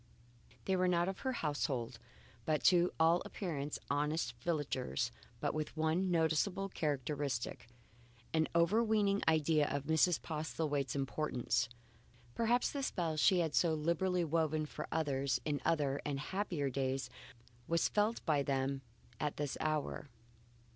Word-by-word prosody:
They 190 Hz, -, +2 dB
were 185 Hz, 0 st, +2 dB
not 175 Hz, -1 st, +2 dB
of 190 Hz, 0 st, -3 dB
her 260 Hz, -, -1 dB
household, 145 Hz, -, -2 dB, 0.4 s
but 155 Hz, +2 st, 0 dB
to 175 Hz, 0 st, +5 dB
all 165 Hz, +2 st, +5 dB
appearance 150 Hz, -7 st, -4 dB
honest 145 Hz, -3 st, 0 dB
villagers 145 Hz, -, -1 dB, 0.3 s
with -, -, 0 dB
but -, -, -16 dB
one 160 Hz, +4 st, +1 dB
noticeable 175 Hz, +4 st, +1 dB
characteristic, 140 Hz, -6 st, -2 dB, 0.7 s
an 160 Hz, -1 st, +3 dB
overweening 205 Hz, +3 st, +3 dB
idea 155 Hz, -1 st, +3 dB
of 140 Hz, 0 st, -2 dB
Mrs. 160 Hz, +2 st, +3 dB
Postlethwaite's 150 Hz, -4 st, -2 dB
importance. 135 Hz, -3 st, 0 dB, 0.6 s
Perhaps 235 Hz, -, +2 dB
the 280 Hz, -, -3 dB
spell 170 Hz, -11 st, -1 dB
she 180 Hz, +4 st, +4 dB
had 160 Hz, -3 st, -1 dB
so 165 Hz, -3 st, +3 dB
liberally 170 Hz, +3 st, +1 dB
woven 155 Hz, -1 st, +1 dB
for 150 Hz, 0 st, -6 dB
others 140 Hz, -4 st, 0 dB
in 145 Hz, -2 st, -1 dB
other 145 Hz, -4 st, +1 dB
and 140 Hz, -2 st, -2 dB
happier 160 Hz, -4 st, -2 dB
days 130 Hz, -1 st, -1 dB, 0.6 s
was 170 Hz, 0 st, +2 dB
felt 215 Hz, +2 st, 0 dB
by 150 Hz, -4 st, +3 dB
them 135 Hz, 0 st, -1 dB, 0.4 s
at 150 Hz, -1 st, -2 dB
this 145 Hz, -2 st, -2 dB
hour. 155 Hz, -2 st, -2 dB
155 Hz, 135 wpm, -35 LUFS, 140-175 Hz, 0.7 s, to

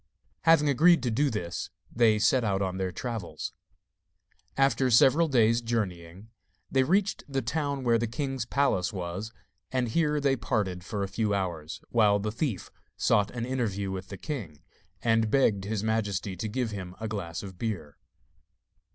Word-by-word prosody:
Having 165 Hz, -2 st, +5 dB
agreed 165 Hz, +5 st, +5 dB
to 120 Hz, -, 0 dB
do 140 Hz, +6 st, +2 dB
this, 90 Hz, -7 st, -4 dB, 0.3 s
they 110 Hz, -2 st, +4 dB
set 110 Hz, +4 st, +3 dB
out 100 Hz, -3 st, +1 dB
on 95 Hz, -1 st, -2 dB
their 95 Hz, -1 st, -2 dB
travels. 115 Hz, -1 st, -5 dB, 1.0 s
After 135 Hz, -1 st, +3 dB
several 135 Hz, +7 st, +5 dB
days' 115 Hz, -4 st, +3 dB
journeying, 100 Hz, -4 st, -4 dB, 0.4 s
they 135 Hz, -, +4 dB
reached 190 Hz, +8 st, +1 dB
the 135 Hz, -1 st, -1 dB
town 140 Hz, +2 st, -2 dB
where 115 Hz, -2 st, +3 dB
the 120 Hz, -, 0 dB
king's 135 Hz, +2 st, -3 dB
palace 120 Hz, -9 st, +1 dB
was, 95 Hz, +3 st, -5 dB, 0.4 s
and 125 Hz, -2 st, 0 dB
here 150 Hz, +3 st, +1 dB
they 140 Hz, -2 st, +2 dB
parted 95 Hz, -7 st, -2 dB
for 100 Hz, +1 st, -3 dB
a -, -, -1 dB
few 105 Hz, +1 st, 0 dB
hours, 85 Hz, -5 st, -4 dB
while 105 Hz, -3 st, +4 dB
the 105 Hz, +1 st, -2 dB
thief 115 Hz, -, -3 dB, 0.3 s
sought 100 Hz, 0 st, +3 dB
an 120 Hz, -1 st, -4 dB
interview 105 Hz, -7 st, -2 dB
with 95 Hz, 0 st, -5 dB
the 100 Hz, -, -8 dB
king, 95 Hz, -, -6 dB, 0.4 s
and 115 Hz, -1 st, +3 dB
begged 105 Hz, -6 st, +2 dB
his 105 Hz, 0 st, -2 dB
majesty 105 Hz, -3 st, -1 dB
to 110 Hz, -, -4 dB
give 120 Hz, 0 st, -2 dB
him 95 Hz, -3 st, -6 dB
a 110 Hz, -, -3 dB
glass 100 Hz, -6 st, -4 dB
of 95 Hz, -3 st, -9 dB
beer. 85 Hz, -11 st, -4 dB
110 Hz, 165 wpm, -28 LUFS, 95-130 Hz, 1.0 s, Having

